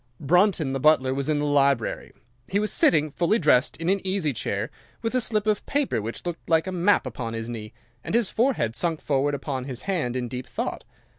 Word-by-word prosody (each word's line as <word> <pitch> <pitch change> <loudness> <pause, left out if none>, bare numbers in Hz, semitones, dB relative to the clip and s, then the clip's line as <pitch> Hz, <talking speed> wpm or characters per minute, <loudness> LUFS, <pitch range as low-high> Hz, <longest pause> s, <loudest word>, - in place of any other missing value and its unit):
"'Brunton, 175 -2 +2
the 135 - -1
butler, 135 -3 +4
was 140 +2 -2
in 155 - +2
the 145 - 0
library. 140 -4 +1 0.4
He 195 - 0
was 210 +1 0
sitting, 155 -2 +3
fully 175 +8 +2
dressed, 145 - +3
in 165 - -4
an 195 +1 +2
easy 185 -6 0
chair, 105 -1 -3 0.3
with 225 - -1
a 255 - +2
slip 215 -2 0
of 215 -1 +1
paper 280 - 0
which 115 +9 -6
looked 175 -1 -6
like 160 -1 +3
a 190 - -3
map 185 0 +2
upon 115 -2 -5
his 115 +1 -4
knee, 110 -2 -7 0.3
and - - -2
his 235 -4 +2
forehead 225 - +1
sunk 165 +5 0
forward 145 0 0
upon 135 -2 -4
his 130 -3 -6
hand 165 -11 -1
in 125 -1 -2
deep 125 +1 -6
thought. - - -4
150 Hz, 215 wpm, -25 LUFS, 130-190 Hz, 0.4 s, butler